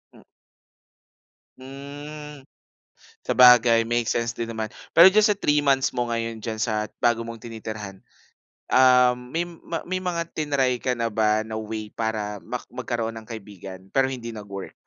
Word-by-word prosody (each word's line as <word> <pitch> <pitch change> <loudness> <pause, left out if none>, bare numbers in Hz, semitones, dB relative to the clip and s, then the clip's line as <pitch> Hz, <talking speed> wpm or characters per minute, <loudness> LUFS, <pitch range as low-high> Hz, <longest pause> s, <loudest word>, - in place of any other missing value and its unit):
Mm. - - -17 1.4
Hmm, 145 +2 -9 0.7
sabagay 120 -2 +6
make 120 0 -1
sense 115 0 0
din 115 -1 -5
naman. 110 -1 -4 0.2
Pero 175 +3 +9
diyan 215 +1 +5
sa 210 - +2
3 150 -6 +2
months 135 -2 +2
mo 120 -1 -2
ngayon 115 -1 -3
diyan 110 0 -4
sa 110 -1 -1
bago 120 -1 +2
mong 115 -1 -7
tinitirhan, 110 -4 -7 0.7
ah, 125 -1 +5
may 135 +8 -4
ma 165 -1 -6
mga 180 -2 -2
triny 140 -5 +1
ka 130 - +2
na 115 -1 -1
ba 110 0 +2
na 110 0 -5
way 110 0 -5
para 105 -1 -3
mak - - -6
magkaroon 115 -1 -4
ng 110 - -8
kaibigan, 95 -4 -10
pero 135 +6 +2
hindi 115 -3 -7
nag-work? 100 -2 -8
120 Hz, 150 wpm, -24 LUFS, 110-135 Hz, 1.4 s, Pero